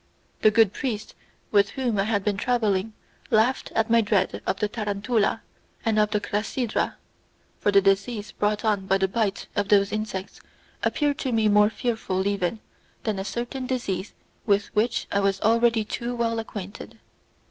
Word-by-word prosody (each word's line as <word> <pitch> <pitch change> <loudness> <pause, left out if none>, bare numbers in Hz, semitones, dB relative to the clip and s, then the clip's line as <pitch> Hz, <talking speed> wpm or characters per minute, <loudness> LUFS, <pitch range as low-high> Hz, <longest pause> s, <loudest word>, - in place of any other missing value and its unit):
The 215 - +7
good 220 -2 +4
priests 220 -6 -4 0.4
with 200 -1 +4
whom 245 -6 -1
I 195 - +2
had 205 -2 0
been 210 -1 0
travelling 215 -2 0 0.4
laughed 230 +4 +2
at 225 0 +2
my 230 0 +6
dread 205 -3 0
of 195 - 0
the 210 - +1
tarantula 210 +1 -1 0.4
and 220 -1 +2
of 210 0 +3
the 210 -1 +1
crasydra, 210 +3 -1 0.6
for 205 - +2
the 200 0 +6
disease 200 +2 +1
brought 210 +1 -1
on 200 -3 +1
by 195 - +3
the 190 0 +1
bite 200 0 -1
of 205 -1 0
those 200 -1 +4
insects 210 -3 -4 0.4
appeared 290 -2 0
to 260 - -1
me 220 -2 +2
more 210 0 +5
fearful 220 -5 -2
even 200 +1 -1 0.4
than 215 -4 -1
a - - -2
certain 240 +5 -4
disease 200 -7 -3 0.3
with 200 -1 +1
which 220 +4 +1
I 200 - +2
was 195 -1 +1
already 230 0 +3
too 240 +3 -4
well 230 -1 0
acquainted. 205 -3 -8
210 Hz, 170 wpm, -25 LUFS, 200-230 Hz, 0.6 s, The